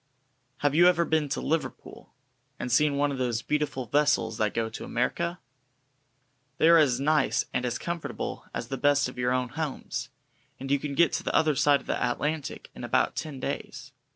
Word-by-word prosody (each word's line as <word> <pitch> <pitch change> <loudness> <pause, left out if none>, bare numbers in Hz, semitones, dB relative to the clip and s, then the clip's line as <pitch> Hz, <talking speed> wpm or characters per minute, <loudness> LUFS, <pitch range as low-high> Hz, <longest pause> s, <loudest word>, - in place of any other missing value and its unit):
Have 145 -1 +2
you 175 +3 +6
ever 170 -1 +4
been 155 -3 +1
to 140 - -2
Liverpool, 160 +1 -4 0.5
and 125 - -4
seen 145 +3 +3
one 145 0 +2
of 135 - -4
those 120 -2 -1
beautiful 150 -4 -1
vessels 145 -4 +1
that 105 -1 +2
go 115 -1 0
to 110 - -7
America? 170 +8 -1 1.2
They 160 - +5
are 170 0 +8
as 130 -5 +3
nice 150 0 +2
and 125 - 0
as 120 - -2
comfortable 170 -1 -5
as 115 - -5
the 135 - -4
best 145 -1 +3
of 125 0 -9
your 125 0 +1
own 125 -1 0
homes, 130 -4 -4 0.5
and 135 +1 -5
you 140 - +3
can 140 0 -4
get 170 +2 +4
to - - -1
the - - -2
other 155 -2 +3
side 140 0 +4
of - - -18
the - - -2
Atlantic 145 +4 -2
in - - -9
about - - +1
ten 150 -4 -5
days. - - -5
140 Hz, 195 wpm, -27 LUFS, 125-155 Hz, 1.2 s, are